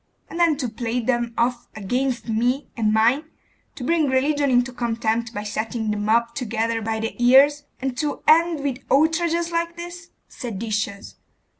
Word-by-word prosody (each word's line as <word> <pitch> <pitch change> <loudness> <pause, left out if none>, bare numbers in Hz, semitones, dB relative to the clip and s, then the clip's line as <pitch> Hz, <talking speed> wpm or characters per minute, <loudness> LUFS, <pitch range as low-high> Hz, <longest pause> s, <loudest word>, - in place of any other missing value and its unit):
And 335 - -6
then 330 -4 +3
to 265 -4 -2
play 235 +1 -3
them 240 0 0
off 240 0 0
against 245 +5 -2
me 245 +5 0
and 220 -3 +1
mine, 230 +7 +3 0.5
to 255 - -7
bring 320 +2 +2
religion 285 +2 +1
into 245 0 +2
contempt 230 -1 -1
by 205 -2 -5
setting 220 +1 -3
the 210 - -2
mob 230 +3 +1
together 230 -2 -2
by 220 0 -2
the 225 0 -3
ears, 285 +4 +5
and 260 -1 -3
to 295 -1 -2
end 330 -1 +4
with 275 -3 -2
outrages 330 +3 +2
like 335 0 -1
this! 345 0 -8 0.2
Seditious! 210 -3 -4
245 Hz, 160 wpm, -23 LUFS, 225-290 Hz, 0.5 s, ears